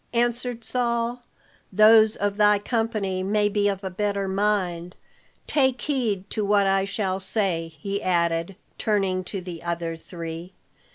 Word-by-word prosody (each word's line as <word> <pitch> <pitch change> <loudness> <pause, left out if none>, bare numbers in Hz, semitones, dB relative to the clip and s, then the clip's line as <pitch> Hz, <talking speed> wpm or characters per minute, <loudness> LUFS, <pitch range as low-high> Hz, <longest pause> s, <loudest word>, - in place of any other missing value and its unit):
answered 240 0 0
Saul. 235 +1 -1 0.5
"Those 215 +2 +6
of 205 0 -1
thy 210 -1 +5
company 210 -4 -1
may 205 +2 +1
be 205 0 +1
of 195 -1 -2
a 190 - -4
better 200 +1 -1
mind. 190 -3 -1 0.5
Take 265 -4 +2
heed 225 -10 -1
to 215 - -1
what 200 0 +3
I 195 0 +2
shall 195 -2 -2
say," 175 -5 -1
he 200 +4 -3
added, 170 0 0 0.2
turning 195 -4 0
to 195 0 -5
the 175 -2 -8
other 170 -1 -3
three. 165 +1 -8
200 Hz, 145 wpm, -24 LUFS, 185-220 Hz, 0.5 s, Those